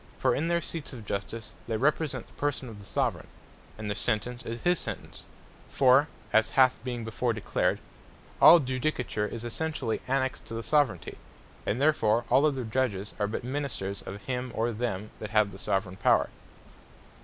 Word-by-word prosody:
For - - +2
in 160 - 0
their 170 0 +2
Seats 160 -3 -5
of 115 -4 -9
Justice 105 +3 -4 0.2
they 115 -2 0
represent 140 -1 0
the - - -22
person 140 -3 -2
of 105 -2 -10
the - - -11
Soveraign; - - -1 0.5
and 110 -1 -5
their 105 - 0
Sentence, 120 +4 -1
is 115 0 -6
his 175 0 +3
Sentence; - - -6 0.5
For 135 +2 +5 0.3
(as 110 0 +4
hath 130 -3 +5
been 120 -2 -3
before 115 +2 -1
declared) 110 - 0 0.6
all 170 - +10
Judicature 130 -5 -1
is 115 0 -4
essentially 145 -2 -2
annexed 130 0 -1
to 115 - -5
the 115 - -4
Soveraignty; 135 - +1 0.5
and 110 - 0
therefore 120 -6 +3
all 135 +4 +6
other 135 -4 -1
Judges 110 -4 -1
are 105 - +1
but 110 - -4
Ministers 125 -7 -3
of 100 +1 -8
him, 125 -1 -3
or 115 +2 +1
them 110 -3 -3
that 105 - -5
have 105 -2 +3
the 95 - -11
Soveraign 95 -1 -1
Power. - - +3
120 Hz, 175 wpm, -28 LUFS, 110-135 Hz, 0.6 s, all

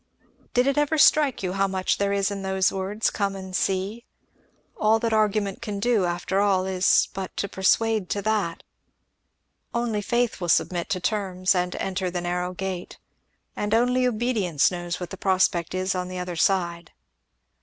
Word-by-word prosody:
Did 245 +1 +4
it 275 +2 +2
ever 295 +2 +1
strike 290 -6 +4
you 180 -1 -1
how 195 0 +1
much 190 -1 -1
there 200 0 +1
is 200 0 +1
in 200 -1 -4
those 190 -1 +1
words 195 +3 -1
'Come 200 -1 -1
and 190 -1 -7
see'? 195 +6 -1 0.7
All 215 +1 +3
that 225 0 -1
argument 210 -2 +1
can 210 -3 -4
do, 220 -3 +2
after 175 +2 -1
all, 195 -2 +2
is 185 -1 +3
but 190 -1 -6
to 200 - -1
persuade 210 +1 +1
to 205 - -1
that. 210 -6 -1 1.1
Only 235 -3 0
faith 235 -1 0
will 175 - -2
submit 175 +1 +1
to 185 - -1
terms 185 -2 0
and 180 -1 -1
enter 185 -1 -2
the 175 0 -3
narrrow 180 +1 -2
gate; 185 -1 -5 0.6
and 210 +1 0
only 250 +2 +3
obedience 215 - +1
knows 175 -1 -4
what 180 - -6
the 195 - -6
prospect 185 -2 +1
is 185 +1 0
on 180 -1 -3
the 185 0 -6
other 180 -1 -4
side." 170 -1 0
195 Hz, 175 wpm, -25 LUFS, 185-215 Hz, 1.1 s, Did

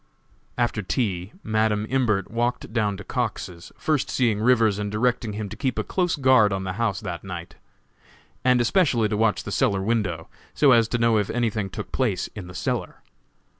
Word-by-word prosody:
After 120 -3 0
tea, 95 -3 -2
Madam 110 -1 +1
Imbert 115 -7 0
walked 120 -1 -2
down 105 -4 0
to 105 - -8
Cox's, 95 -8 -4
first 150 -4 0
seeing 115 -5 +1
Rivers 110 -4 +3
and 105 -1 -3
directing 115 0 0
him 105 0 -4
to 110 - -7
keep 130 +1 -2
a 110 - 0
close 180 - 0
guard 130 -7 +4
on 95 0 -2
the 95 -1 -3
house 100 -5 0
that 90 -5 -5
night, 90 -3 -7 0.9
and 125 -1 +4
especially 120 - +2
to 105 - -1
watch 110 0 +1
the - - -6
cellar 95 -1 +1
window, 95 -7 -1 0.3
so 145 -3 +5
as 115 -2 +5
to 120 - -1
know 115 -2 +3
if 105 - -2
anything 110 -4 -1
took - - -7
place 105 -9 0
in 100 -4 -8
the 90 - -11
cellar. - - -3
110 Hz, 185 wpm, -24 LUFS, 100-120 Hz, 0.9 s, so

